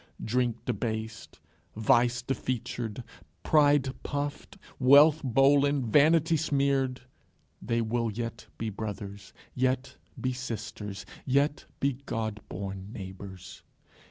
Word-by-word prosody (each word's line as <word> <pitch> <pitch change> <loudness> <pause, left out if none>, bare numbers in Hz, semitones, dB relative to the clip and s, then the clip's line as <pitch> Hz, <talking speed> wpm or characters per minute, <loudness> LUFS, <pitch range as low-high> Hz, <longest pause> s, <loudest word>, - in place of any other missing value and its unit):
Drink 120 0 0
debased, 110 -1 -4 0.4
vice 120 +1 +3
defeatured, 120 -3 -3 0.4
pride 145 -3 +4
puffed, 145 +7 -4 0.2
wealth 145 +4 +7
bollen, 140 +2 +4
vanity 160 +3 +5
smeared, 140 -4 +1 0.6
they 115 0 0
will 115 +1 0
yet 115 +2 -5
be 110 -1 -3
brothers, 100 -2 -6 0.2
yet 130 +1 -1 0.2
be 130 0 -1
sisters, 110 -5 -6 0.2
yet 140 +3 +1
be 135 -2 0
God 110 -1 -2
born 95 +1 -6
neighbours. 95 -3 -9
125 Hz, 100 wpm, -29 LUFS, 110-140 Hz, 0.6 s, wealth